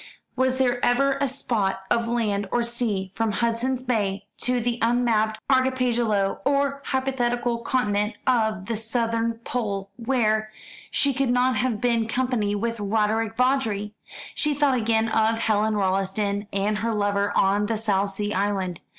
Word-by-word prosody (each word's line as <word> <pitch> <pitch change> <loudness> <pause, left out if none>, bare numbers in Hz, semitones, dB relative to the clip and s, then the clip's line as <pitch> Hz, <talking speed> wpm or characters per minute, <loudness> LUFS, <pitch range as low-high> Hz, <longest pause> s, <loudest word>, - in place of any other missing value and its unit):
Was 260 0 +1
there 245 -2 +1
ever 275 +3 +2
a 280 - +3
spot 225 -8 -1
of 230 0 +2
land 210 -4 -1
or 240 - +1
sea, 225 -6 -2
from 225 -2 -1
Hudson's 240 +3 -1
Bay 200 -5 -1
to 250 0 +1
the 240 0 -1
unmapped 230 -2 +2
archipelago 245 -6 +1
or 280 0 +1
hypothetical 245 -3 0
continent 210 -3 0
of 220 -6 +1
the 230 - -2
Southern 230 +1 -1
Pole, 200 -6 -3
where 225 -3 +1 0.4
she 280 -1 +2
could 265 0 0
not 250 +1 +2
have 245 -4 0
been 235 -2 +1
happy 245 -5 0
with 230 +2 -2
Roderick 220 +2 0
Vawdrey? 225 -6 +1 0.4
She 300 -1 0
thought 285 -1 +3
again 225 -2 +1
of 220 0 +2
Helen 215 -1 +1
Rolleston 200 +1 0
and 205 +2 0
her 230 0 -1
lover 205 0 0
on 200 +2 +2
the 225 - -1
South 200 -2 0
Sea 205 +1 -3
island. 190 -3 -1
225 Hz, 150 wpm, -24 LUFS, 205-245 Hz, 0.4 s, a